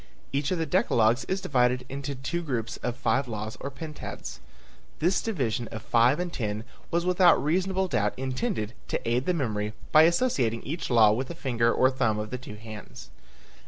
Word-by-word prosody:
Each 140 +2 0
of 185 - 0
the 165 - 0
decalogues 120 -4 +2
is 190 0 -1
divided 125 -7 +2
into 140 +1 -5
two 135 +7 -3
groups 125 -6 -3
of 120 -1 -3
five 135 0 +1
laws 110 -1 -5
or 140 - -4
pentads. 155 +2 -7 0.6
This 180 +4 +2
division 125 - -1
of 110 0 -7
five 120 +5 +3
and 180 -1 -3
ten 105 -2 -3 0.3
was 170 0 0
without 180 -1 +6
reasonable 190 +4 0
doubt 105 - 0
intended 130 - -2
to - - -3
aid 120 +3 +1
the 180 - +2
memory 105 -7 -2 0.2
by 155 - +8
associating 135 - 0
each 160 +5 -4
law 115 -4 +6
with 125 +5 -1
a 170 - -6
finger 120 -6 +1
or 130 +2 +3
thumb 115 -5 +1
of 105 0 -4
the 125 - -3
two 115 -4 -9
hands. 110 -1 -10
130 Hz, 185 wpm, -27 LUFS, 115-165 Hz, 0.6 s, by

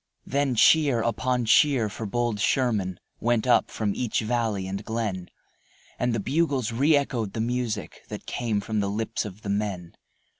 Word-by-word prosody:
Then 140 -2 0
cheer 140 -1 +5
upon 125 +1 0
cheer 120 0 +4
for 105 +2 -6
bold 120 0 -1
Sherman 105 -7 +1 0.2
Went 120 -1 +1
up 125 - +3
from 105 -2 -2
each 120 0 -1
valley 110 -4 -1
and 100 +2 -4
glen, 105 -6 -3 0.7
And 120 - +1
the - - -1
bugles 135 -1 0
re 140 +7 +3
echoed 120 -8 -1
the - - -4
music 115 -6 -2
That - - -7
came 110 -4 -1
from 110 +1 -2
the 100 -1 0
lips 110 +2 -2
of 105 +1 -9
the 100 - -5
men. 100 -4 -2
115 Hz, 165 wpm, -26 LUFS, 105-125 Hz, 0.7 s, cheer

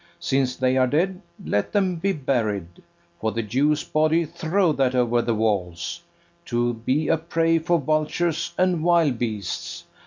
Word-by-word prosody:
Since 130 -1 0
they 130 0 +1
are 130 -1 +4
dead, 180 +7 0 0.2
let 105 - -1
them 190 -4 +1
be 195 +4 0
buried: 110 - -2 0.4
For 110 0 -1
the 115 +2 -2
Jew's 145 +7 +1
body, 155 +2 +2
throw 165 +3 0
that 130 -2 +1
o'er 120 -1 +2
the 115 -1 -1
walls, 90 -6 -1 0.4
To 120 0 0
be 130 +7 -1
a 165 - +3
prey 165 0 +1
for 170 +2 +1
vultures 155 +2 0
and 180 -3 +1
wild 165 -8 +3
beasts. 105 -6 -4
140 Hz, 155 wpm, -23 LUFS, 115-165 Hz, 0.4 s, are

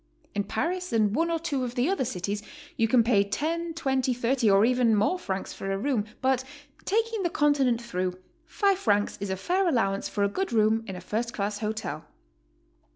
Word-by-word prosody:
In 205 0 -1
Paris 360 +1 -2
and 215 -3 +2
one 330 +3 +1
or 335 - +1
two 295 -5 -2
of 245 -1 -4
the 245 +3 +2
other 375 -8 0
cities 205 -2 -3 0.3
you 225 -4 +2
can 235 +1 +4
pay 215 -4 +4
10, 330 +10 -2
20, 265 -5 0
30 245 -1 +2
or 200 +2 +5
even 245 -2 +3
more 215 - +2
francs 195 - -4
for 195 - -4
a 195 - 0
room, 225 -1 0 0.2
but 260 -1 +2 0.4
taking 450 +1 0
the 350 - +1
Continent 285 -7 +2
through, 185 -6 -3 0.3
5 395 +2 +1
francs 205 - +1
is 200 - -3
a 190 - -1
fair 365 - +1
allowance 195 -8 0
for 205 - -1
a - - +4
good 380 - -2
room 220 0 +3
in 190 - -5
a 180 - -7
first 230 +5 -3
class 205 0 -2
hotel. 210 -8 -4
235 Hz, 200 wpm, -27 LUFS, 205-295 Hz, 0.4 s, or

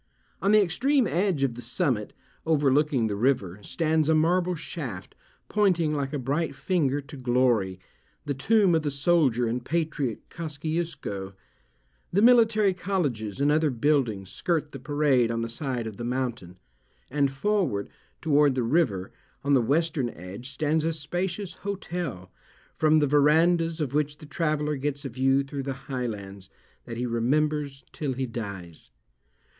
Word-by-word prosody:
On 200 - +2
the 215 -1 +6
extreme 255 - +2
edge 180 -6 +1
of 130 -3 +1
the 120 - -8
summit, 125 - -1 0.3
overlooking 145 -4 +2
the 105 -2 -1
river, 100 -5 0
stands 155 +6 0
a 160 - +5
marble 175 +3 +2
shaft, 145 - -6 0.3
pointing 180 -7 +2
like 140 -2 -2
a 150 - -2
bright 140 +3 -1
finger 145 -5 0
to 145 +2 -12
glory, 120 -7 +1 0.5
the 145 - -1
tomb 195 - +3
of 160 - +3
the 150 - -1
soldier 140 -4 +2
and 120 +2 -2
patriot 155 -6 -2
Kosciusko. 150 - -4 0.8
The 200 - +2
military 225 -4 +5
colleges 145 - -2
and 145 +1 +3
other 155 0 +3
buildings 120 -7 0
skirt 155 -4 -1
the 135 - -8
parade 135 -3 +2
on 115 0 -1
the 115 - -3
side 125 -1 -3
of 110 -3 -6
the - - -5
mountain; 120 -7 -3 0.5
and 140 -1 +2
forward, 165 - 0 0.4
toward 145 -3 +4
the 125 - 0
river, 115 - +1 0.3
on 140 +1 +2
the 130 - +5
western 145 +1 +1
edge, 100 +6 -9
stands 150 +3 0
a 165 +1 0
spacious 175 +4 -3
hotel, 175 - -4 0.4
from 155 0 +4
the 150 -1 +3
verandahs 165 +4 +3
of 140 -4 -2
which 150 0 0
the 155 - -12
traveller 150 -1 -1
gets 145 +1 -3
a - - -2
view 135 +3 +2
through 140 0 -5
the 135 0 -3
highlands, 100 -7 -5 0.4
that 115 -1 -6
he 125 - -1
remembers 140 +4 0
till 145 -4 -3
he 130 +1 -2
dies. 100 - -7
145 Hz, 155 wpm, -26 LUFS, 120-160 Hz, 0.8 s, the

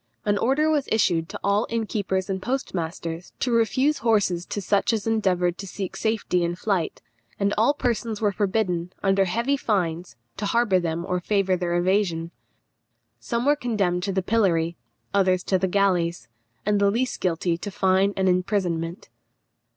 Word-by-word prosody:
An 205 - +2
order 275 +5 +2
was 300 -3 +1
issued 175 -7 +2
to - - -6
all 200 +2 +2
innkeepers 205 -4 -1
and 190 -1 -3
postmasters 175 -8 -4
to 250 - 0
refuse 235 +6 +2
horses 205 -7 +1
to - - -3
such 200 +3 +1
as 215 -2 -1
endeavoured 185 -6 +1
to 195 - -6
seek 190 0 -5
safety 220 -5 0
in 170 0 -1
flight; 185 -2 -2 0.4
and 200 0 +1
all 230 +7 +3
persons 235 -5 -1
were 210 -2 +2
forbidden, 185 -4 -1
under 195 0 +3
heavy 235 +9 0
fines, 175 - -1 0.2
to 205 - -2
harbour 220 -4 +3
them 170 0 -2
or 180 -1 -1
favour 195 0 +1
their 175 -1 -1
evasion. 175 -2 +1 0.9
Some 235 0 -2
were 290 +1 +5
condemned 205 -10 0
to 195 +2 -2
the 190 -1 -1
pillory, 175 -6 +1 0.4
others 185 -2 +2
to 190 - +1
the 190 - +1
galleys, 180 -3 +1 0.4
and 205 0 +2
the 200 - +5
least 245 +5 -1
guilty 175 -1 0
to 205 - -5
fine 190 0 +2
and 190 0 +2
imprisonment. 180 -1 -1
195 Hz, 165 wpm, -24 LUFS, 180-220 Hz, 0.9 s, were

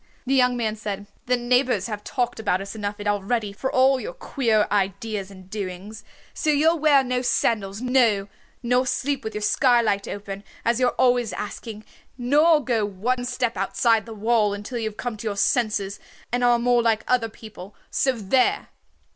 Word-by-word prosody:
The 265 - 0
young 250 -2 +3
man 220 -2 -1
said, 205 -2 -5 0.2
"The 250 0 +3
neighbors 245 -4 +1
have 210 -2 -5
talked 245 -4 -2
about 200 -4 0
us 195 +1 -7
enough 210 -1 -4
already 205 +1 -1
for 265 +6 -3
all 260 +1 +4
your - - -6
queer 230 - +1
ideas 200 0 -1
and 185 -2 -14
doings. 200 +1 -6 0.3
So 310 - -2
you'll 315 +3 +3
wear 290 -3 +5
no 250 -1 -1
sandals, 215 -4 0
no, 240 -6 +2 0.4
nor 250 +2 +2
sleep 265 +3 -1
with 220 - -5
your 210 - -3
skylight 230 -4 +2
open, 200 -1 -6 0.2
as 235 +1 +2
you're 250 -1 +1
always 245 -3 +2
asking, 215 0 -7 0.3
nor 295 +5 +4
go 230 -4 +1
one 230 +6 -2
step 245 -2 -1
outside 220 +3 +1
the 225 - -7
wall 215 -1 +2
until 215 +4 -5
you 220 -1 -1
have 215 - -16
come 240 -2 -4
to 220 - -5
your 200 -1 -3
senses 210 -4 0 0.3
and 245 +1 0
are 240 0 +5
more 240 0 +3
like 225 -2 +1
other 240 -3 +1
people. 210 -3 -12 0.2
So 265 - +2
there!" 255 - +1
230 Hz, 180 wpm, -24 LUFS, 205-250 Hz, 0.4 s, wear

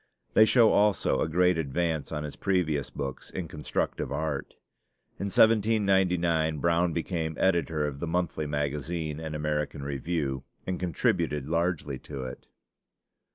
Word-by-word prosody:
They 110 - +7
show 110 +1 +5
also 105 -1 +3
a - - 0
great 90 +1 +3
advance 80 +1 -1
on 75 -1 -3
his 75 - -6
previous 80 -8 0
books 70 -2 -6
in 90 -3 -5
constructive 75 -1 -3
art. 75 -3 -3 0.6
In 100 - -2
1799 95 -7 +3
Brown 85 +3 +2
became 80 -1 -2
editor 85 -5 +1
of 70 -1 -4
the 85 - -3
Monthly 80 -2 -1
Magazine 75 +2 -2
and 80 -1 -5
American 75 -1 -2
Review, 70 -1 -2 0.2
and 95 -1 -2
contributed 75 -4 0
largely 85 -4 -1
to 70 -3 -7
it. 65 -1 -8
80 Hz, 135 wpm, -28 LUFS, 75-90 Hz, 0.6 s, They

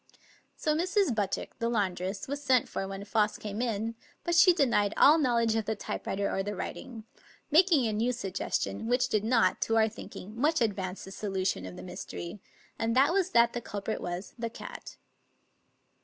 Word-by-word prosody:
So 305 - 0
Mrs. 365 - +2
Buttick, 205 -3 -3
the 230 - 0
laundress, 195 -3 -1
was 285 +1 -4
sent 260 -4 +3
for 195 - -4
when 195 +1 -6
Foss 210 0 +1
came 210 +1 -5
in; 225 -2 -1 0.3
but 345 - -1
she 340 +2 +7
denied 235 - +2
all 305 +3 +7
knowledge 235 -5 +2
of 220 -1 0
the 220 - -1
typewriter 200 -1 -3
or 195 - -1
the 205 +1 -4
writing, 225 +4 -6 0.5
making 320 -4 +5
a 220 - 0
new 230 +4 +1
suggestion, 195 - -3
which 245 +1 +2
did 215 -3 +1
not, 225 -5 +2
to 225 - +1
our 220 0 +5
thinking, 215 -1 -9
much 300 +7 +2
advance 195 -5 -2
the 195 - -9
solution 190 - -2
of 90 - -9
the - - -9
mystery, 180 +1 -7 0.4
and 225 +1 0
that 275 +6 +5
was 380 -1 +2
that 235 -6 +4
the 240 - -3
culprit 210 -1 -4
was 175 +2 -5
the 230 0 -2
cat. 225 - -9
225 Hz, 185 wpm, -29 LUFS, 200-250 Hz, 0.5 s, she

